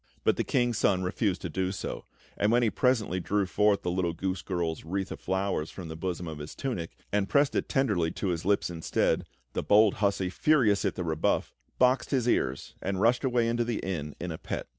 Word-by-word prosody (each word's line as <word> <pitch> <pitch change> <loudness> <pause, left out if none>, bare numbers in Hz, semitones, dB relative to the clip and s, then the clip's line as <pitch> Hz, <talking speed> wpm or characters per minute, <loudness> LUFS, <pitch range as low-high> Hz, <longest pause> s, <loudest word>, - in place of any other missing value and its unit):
But - - +3
the - - 0
King's 120 -3 +1
Son 95 -2 +2
refused 95 +1 -1
to - - -1
do 95 +4 -1
so; 95 - -5 0.3
and 105 +2 +2
when 120 +1 +4
he 110 - +2
presently 115 -8 +1
drew 100 +3 0
forth 105 +2 +2
the 90 - -1
little 90 -2 0
goose 95 +1 -2
girl's 85 -4 -2
wreath 95 +3 -3
of - - -6
flowers 95 -4 -1
from 90 -4 -8
the 80 - -6
bosom 90 0 -3
of 80 -2 -6
his 75 +1 -8
tunic, 115 -12 -4
and 100 -1 +1
pressed 140 -1 +3
it - - -1
tenderly 105 - +1
to 100 - -2
his 85 0 -2
lips 100 -1 +1
instead, 85 -1 0 0.3
the - - -1
bold 105 0 +5
hussy, 100 -3 +1
furious 115 -7 +3
at - - 0
the 90 - -3
rebuff, 80 -2 0 0.2
boxed 125 0 +3
his 130 -4 +1
ears 70 - 0
and 95 0 -2
rushed 120 +5 +3
away 120 -3 +2
into 120 +1 +1
the 115 -2 -2
inn 75 -6 -4
in 90 0 -4
a 80 - -6
pet. - - -4
95 Hz, 220 wpm, -28 LUFS, 85-115 Hz, 0.3 s, bold